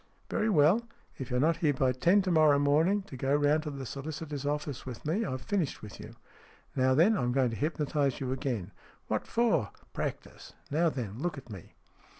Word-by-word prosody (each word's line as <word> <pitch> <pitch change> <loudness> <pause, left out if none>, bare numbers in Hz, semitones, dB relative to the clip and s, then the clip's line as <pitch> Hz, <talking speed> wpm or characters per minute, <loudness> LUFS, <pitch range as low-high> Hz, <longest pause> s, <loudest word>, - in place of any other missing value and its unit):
" - - -36
Very 220 - +1
well. 190 +6 +4 0.3
If 130 -1 -5
you're 125 -1 0
not 160 +4 +3
here 150 -4 +1
by 130 -1 +2
ten 175 +10 +3
to 185 - 0
morrow 155 -3 +5
morning 160 +8 +3
to 190 - -10
go 135 +2 +1
round 145 +1 +3
to 155 - -5
the 135 -2 -6
solicitor's 145 +1 -5
office 145 -2 -3
with 125 0 -8
me, 175 +9 0
I've 130 - -4
finished 185 -9 -2
with 105 - -9
you. - - -10 0.6
Now 130 0 +3
then, 180 +10 +5
I'm 125 -10 0
going 130 -2 +2
to - - -4
hypnotize 145 -1 0
you 130 -2 -3
again." 125 -8 -3 0.3
"What - - -2
for?" 230 - +2
" - - -30
Practice. - - -5 0.2
Now 165 +3 +3
then, 115 -7 -5
look 175 0 -2
at 130 -4 -10
me." 95 -5 -11
145 Hz, 205 wpm, -30 LUFS, 130-165 Hz, 0.6 s, morrow